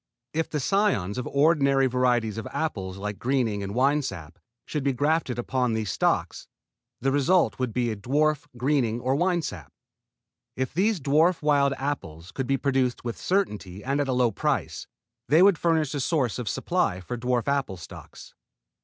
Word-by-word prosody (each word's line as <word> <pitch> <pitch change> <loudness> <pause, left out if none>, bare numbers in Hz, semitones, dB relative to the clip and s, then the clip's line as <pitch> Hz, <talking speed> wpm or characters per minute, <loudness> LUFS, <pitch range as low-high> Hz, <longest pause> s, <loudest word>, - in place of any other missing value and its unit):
If 160 +1 -1
the 150 - -2
cions 140 - +1
of 125 - -4
ordinary 140 -2 +3
varieties 120 -4 +1
of - - -6
apples 95 -12 -3
like 105 +1 -5
Greening 120 -5 0
and 100 +1 -5
Winesap 125 - -1 0.3
should 150 -3 -3
be 140 -1 +1
grafted 145 -1 0
upon 125 -1 0
these 110 -3 -2
stocks, - - -1 0.5
the 135 +2 +1
result 155 +5 +2
would 130 -2 -1
be 120 0 0
a - - -3
dwarf 145 +7 0
Greening 125 -3 +1
or 130 +2 0
Winesap. 160 - -1 0.9
If 130 0 -3
these 200 +4 +1
dwarf 155 +5 +2
wild 140 -2 +3
apples 90 - -5
could 135 -2 -4
be 135 +1 +2
produced 130 -3 0
with 120 -1 -3
certainty 105 - -2
and 140 +2 0
at 140 - -1
a 130 - 0
low 125 -2 +2
price, - - -2 0.4
they 160 +6 +6
would 195 -5 +5
furnish 160 -4 +1
a 145 - -2
source 135 -5 0
of 120 -4 -3
supply 170 - 0
for 110 +7 -5
dwarf 125 +1 -1
apple 140 -9 -1
stocks. 85 - -12
130 Hz, 170 wpm, -26 LUFS, 115-150 Hz, 0.9 s, they